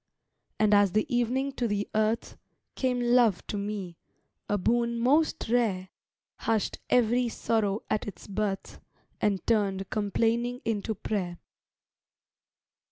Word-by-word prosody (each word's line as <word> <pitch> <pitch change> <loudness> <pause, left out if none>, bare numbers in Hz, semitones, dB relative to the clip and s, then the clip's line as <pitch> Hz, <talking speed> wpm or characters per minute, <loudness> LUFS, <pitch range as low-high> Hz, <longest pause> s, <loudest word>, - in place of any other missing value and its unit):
And 210 -1 +3
as 205 -2 +5
the 215 - +2
evening 255 +3 +1
to 245 -3 -1
the 205 -1 -1
earth, 215 +2 0 0.4
Came 255 -2 0
love 240 -5 +3
to - - -4
me, 200 -4 -4 0.5
a 205 - +2
boon 235 +4 +1
most 285 +7 +2
rare; 215 -6 +1 0.5
Hushed 220 -2 -1
every 245 0 +3
sorrow 215 -2 0
at 215 - -1
its 195 -4 -8
birth, 200 -1 -3 0.4
And 200 -3 +1
turned 195 -4 +1
complaining 230 +4 0
into 220 -1 -1
prayer. 185 -4 -3
215 Hz, 120 wpm, -28 LUFS, 200-240 Hz, 0.5 s, as